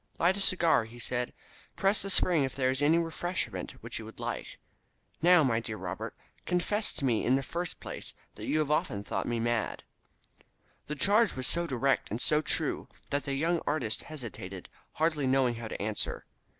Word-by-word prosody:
"Light 180 +3 +3
a 200 - -3
cigar," 170 -10 +3
he 115 +2 -12
said. 125 0 -2 0.4
"Press 195 +2 +3
the 195 - -4
spring 175 -5 +4
if 135 - -3
there 130 -1 +2
is 130 +2 -1
any 155 +3 +5
refreshment 170 +2 -2
which - - -6
you - - -7
would - - -12
like. - - -4 0.6
Now, 175 -1 +7
my 115 -4 +2
dear 110 -2 -5
Robert, - - -5 0.3
confess 205 +4 +2
to 140 - -1
me 115 -4 +2
in 130 - +4
the 135 - 0
first 170 +4 -3
place - - -7 0.2
that - - -8
you 155 - +2
have 150 -1 +1
often 100 -9 0
thought - - -2
me 120 -1 0
mad." 120 -1 -1 1.0
The 150 - -3
charge 205 - +4
was 130 -1 -1
so 170 +5 +2
direct 135 -1 +1
and 110 - -3
so 150 +4 +3
true - - +2 0.2
that 145 0 0
the 140 -1 -1
young 165 +4 +1
artist 125 -8 0
hesitated, 110 - -7 0.2
hardly 155 -3 +1
knowing 130 -2 +3
how 115 -1 -5
to - - -6
answer. 105 +1 -2
140 Hz, 190 wpm, -30 LUFS, 120-170 Hz, 1.0 s, Now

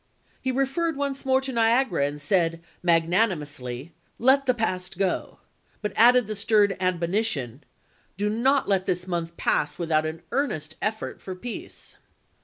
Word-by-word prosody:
He 260 - 0
referred 275 +5 0
once 280 -1 -3
more 265 0 +4
to 265 0 -4
Niagara, 230 - +2
and 145 +1 -6
said, 165 +1 +1 0.2
magnanimously, 165 - 0 0.2
"Let 265 +3 +4
the 255 - +3
past 185 -6 -2
go 190 -2 -1 0.2
"; - - -38
but 210 - -2
added 245 +2 +6
the 215 +1 -4
stern 205 -1 +3
admonition, 170 - -1 0.3
" - - -38
Do 205 +1 0
not 260 +6 +2
let 190 -2 +1
this 180 0 -1
month 170 -2 -3
pass - - 0
without 155 -2 +1
an 160 +1 -7
earnest 160 - -2
effort 220 +1 -3
for 185 - -6
peace." 235 +5 -8
195 Hz, 155 wpm, -25 LUFS, 165-245 Hz, 0.3 s, added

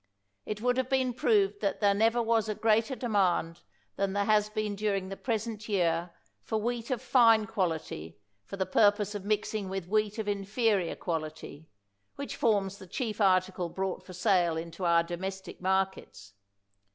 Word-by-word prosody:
It 210 0 -4
would 250 +1 +1
have 260 -1 0
been 260 -2 +1
proved 205 -4 +2
that 200 - -1
there 205 -2 +4
never 225 +3 +2
was 225 -1 +1
a 215 - -1
greater 225 +4 +2
demand 190 -8 0 0.4
than 195 0 0
there 200 0 +1
has 210 0 +3
been 215 -1 -2
during 200 -2 -1
the 195 - -5
present 220 -1 -3
year 175 -3 +1 0.3
for 220 - -2
wheat 235 +1 -3
of 255 -1 -2
fine 230 -4 +5
quality 165 - -3 0.3
for 195 - -8
the 190 - 0
purpose 205 +2 +3
of 205 -2 -6
mixing 210 -1 -1
with 190 -2 -4
wheat 210 +2 0
of 220 -2 -3
inferior 200 -2 0
quality, 155 -2 -5 0.5
which 280 - -5
forms 200 -6 +1
the 190 - -11
chief 220 +1 -3
article 185 -2 +2
brought 190 +2 -3
for 185 - -11
sale 180 -3 +2
into 170 +2 -5
our 170 0 +4
domestic 190 +3 -6
mar 190 +1 +3
kets. 105 - -14
200 Hz, 170 wpm, -29 LUFS, 185-220 Hz, 0.5 s, fine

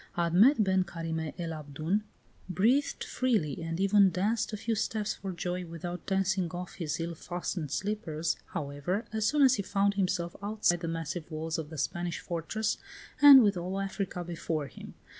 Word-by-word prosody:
VIII. 175 - +1
Admet 220 - +6
ben 190 -1 +2
Carime 165 -2 -4
el 170 -2 -3
Abdoun 155 +6 -2 0.5
breathed 235 +11 +2
freely, 210 - 0
and 165 +1 -3
even 195 0 +5
danced 205 +7 0
a 210 - -3
few 225 +2 -1
steps 215 -1 -1
for 195 - -6
joy, 180 +1 -3
without 175 +1 -7
dancing 190 -2 +1
off 180 +1 -6
his 155 -3 -2
ill 170 +1 -3
fastened 175 -1 -4
slippers, 170 -4 -2 0.2
however, 145 +8 -2
as 220 -1 +1
soon 295 -1 +3
as 260 -2 +7
he - - 0
found 200 0 +1
himself 180 -3 -1
outside 205 -4 +1
the 165 - -4
massive 165 0 -4
walls 160 0 -3
of 155 -2 -5
the 160 - -8
Spanish 175 +5 -2
fortress 180 +6 -2 0.4
and 280 -3 +11
with 205 -2 +3
all 185 +2 -3
Africa 195 -2 -3
before 165 -3 -3
him. 135 - -11
180 Hz, 175 wpm, -30 LUFS, 165-205 Hz, 0.5 s, and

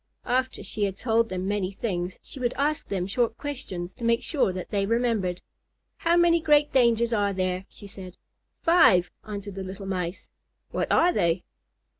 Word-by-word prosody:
After 255 +1 0
she 205 +1 -1
had 195 -1 -3
told 230 0 +1
them 185 0 -3
many 200 -2 -1
things, 185 -3 -3
she 275 - -10
would 245 -1 0
ask 295 +2 0
them 190 -3 -2
short 225 +3 0
questions 190 -11 -5
to 240 - -11
make 230 0 +2
sure 280 - +1
that 185 0 -6
they 200 -1 0
remembered. 225 -6 0 0.6
"How 340 +1 +2
many 340 -1 +4
great 295 -1 +3
dangers 235 -2 +3
are 205 -2 +1
there?" 185 0 -1
she - - -13
said. 190 -2 -10 0.5
"Five," 320 - +5 0.2
answered 205 -1 -5
the 190 0 -5
little 190 +1 -7
Mice. 180 -1 -4 0.4
"What - - -1
are 355 +1 +4
they?" 170 -2 +1
205 Hz, 175 wpm, -26 LUFS, 185-250 Hz, 0.6 s, Five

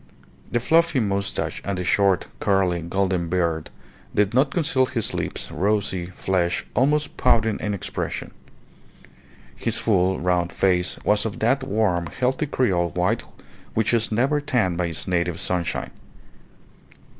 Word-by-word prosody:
The 120 - +2
fluffy 165 +3 +3
moustache 100 -3 -2
and 100 -1 -2
the 90 - -2
short, 95 0 +2
curly, 95 -3 +1
golden 90 0 -1
beard 85 -3 0 0.5
did 105 +1 +2
not 135 +3 +4
conceal 140 -5 +1
his 115 -3 -1
lips, - - -3
rosy, 100 -3 0
fresh, 90 -2 0
almost 145 +5 +1
pouting 115 -4 +2
in 105 -1 -2
expression. 95 - -4 1.2
His 110 - -1
full, 95 -3 +2
round 90 -1 +1
face 90 -2 +1
was 105 0 +3
of 110 -3 -4
that 130 +5 +2
warm, 100 -9 0
healthy 130 +3 -1
creole 95 -11 +1
white 90 +6 0 0.5
which 110 +1 +2
is 115 -1 +1
never 135 +7 +2
tanned 125 - +1
by 85 0 0
its 80 +2 -5
native 85 -2 0
sunshine. 90 -2 -2
100 Hz, 135 wpm, -23 LUFS, 90-120 Hz, 1.2 s, not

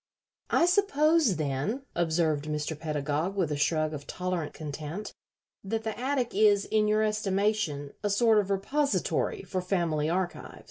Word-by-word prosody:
"I - - +4
suppose, 325 - +3
then," 155 - -2
observed 160 -3 +1
Mr. 150 +1 -2
Pedagog, 150 +3 -2
with 180 -6 0
a - - 0
shrug 155 +1 +1
of 145 -1 -7
tolerant 180 -4 -3
contempt, 155 +6 -6 0.5
"that 220 +3 -2
the 220 -1 -3
attic 255 -1 -1
is, 205 -1 +4
in 215 -1 +2
your 215 +1 +3
estimation, 200 -8 0
a 205 - +1
sort 220 +1 +4
of 200 -2 -1
repository 285 - 0
for 185 -2 -3
family 170 -5 0
archives." 180 +1 -3
190 Hz, 145 wpm, -28 LUFS, 155-215 Hz, 0.5 s, I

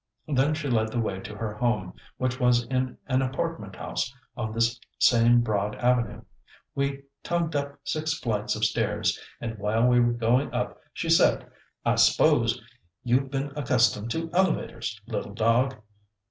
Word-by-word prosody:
Then 145 +1 +2
she 150 -2 -4
led 110 -4 +2
the 120 - -1
way 100 -4 -2
to 105 - -8
her 105 -1 -4
home, 105 -5 -1 0.2
which 130 0 -1
was 120 -1 +3
in 130 0 -2
an 130 -1 +1
apartment 130 - -3
house 120 - -3 0.2
on 110 -4 -3
this 115 +2 +1 0.2
same 120 0 +5
broad 105 -2 -1
avenue. 120 -3 0 0.5
We 140 0 -2 0.2
tugged 170 -2 -1
up 140 0 -2
six 155 0 -1
flights 110 -7 -1
of 110 0 +1
stairs, - - 0 0.2
and 115 -2 -5
while 110 +3 +1
we 125 0 +5
were 120 0 +3
going 120 +3 +1
up - - -2
she - - -4
said, - - +4 0.4
"I - - +2
s'pose - - +4 0.4
you've 130 +2 +1
been 135 +1 -2
accustomed 120 -6 +2
to 165 +5 -3
elevators, 155 - 0
little 100 +1 -4
dog. 120 +4 +2
120 Hz, 160 wpm, -26 LUFS, 110-135 Hz, 0.5 s, same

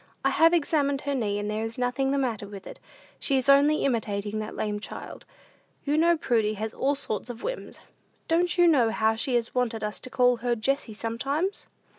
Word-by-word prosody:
"I - - +4
have 330 +1 +5
examined 285 -4 +1
her 285 - -2
knee, 210 -6 -1
and 205 0 -3
there 215 +1 -2
is 225 0 -5
nothing 250 +2 0
the 280 - +1
matter 235 -7 -2
with 200 -1 -10
it. - - -10 0.4
She 275 - +1
is 260 - 0
only 285 +2 +5
imitating 215 -4 -1
that 215 0 -6
lame 210 -1 -2
child. - - -8 0.6
You 290 +1 0
know 335 +2 +4
Prudy 220 -7 +1
has 220 +2 -4
all 280 +2 0
sorts 245 -5 -4
of 235 -1 -8
whims. - - -5 0.5
Don't 350 +2 +2
you 350 -1 +6
know 260 -9 +4
how 220 0 +2
she 245 +3 -1
has 235 -1 -1
wanted 230 -3 -1
us 210 0 -3
to - - -10
call 250 -1 +3
her 240 +1 0
Jessie 235 0 -1
sometimes?" 275 - -2
245 Hz, 205 wpm, -26 LUFS, 220-280 Hz, 0.6 s, you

